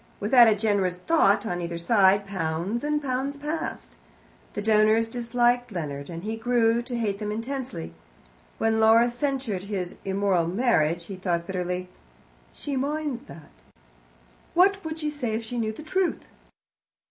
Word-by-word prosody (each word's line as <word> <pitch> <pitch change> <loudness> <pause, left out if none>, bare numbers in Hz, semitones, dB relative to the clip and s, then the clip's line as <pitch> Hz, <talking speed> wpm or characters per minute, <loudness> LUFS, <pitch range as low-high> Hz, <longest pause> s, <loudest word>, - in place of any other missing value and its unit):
Without 235 +3 +6
a 220 - +4
generous 200 -4 +1
thought 200 - +2
on 175 -4 -2
either 170 0 -4
side, 195 +2 +4
pounds 185 - -2
and 300 0 0
pounds 270 +2 -2
passed. 305 +3 -5 0.6
The 205 - -3
donors 215 +1 +4
disliked 240 +1 +1
Leonard, 145 -6 -5
and 170 0 -7
he 220 +2 -3
grew 235 0 +2
to 245 0 -5
hate 205 -4 -1
them 210 -1 -3
intensely. 230 - -5 0.6
When 225 0 +1
Laura 225 +2 +5
censured 245 -7 -2
his 190 -4 -4
immoral 190 -3 +1
marriage, 175 -5 +1
he 195 0 -7
thought 175 -2 -1
bitterly, 180 0 -3 0.6
"She 285 - -5
minds 285 -1 -2
that! 155 -3 -13 1.0
What 390 +3 +4
would 320 0 -5
she 305 -2 -2
say 250 -7 -2
if 225 - -3
she 240 +2 -4
knew 220 -1 -1
the 220 - -10
truth?" 370 +3 -1
220 Hz, 150 wpm, -26 LUFS, 190-250 Hz, 1.0 s, Without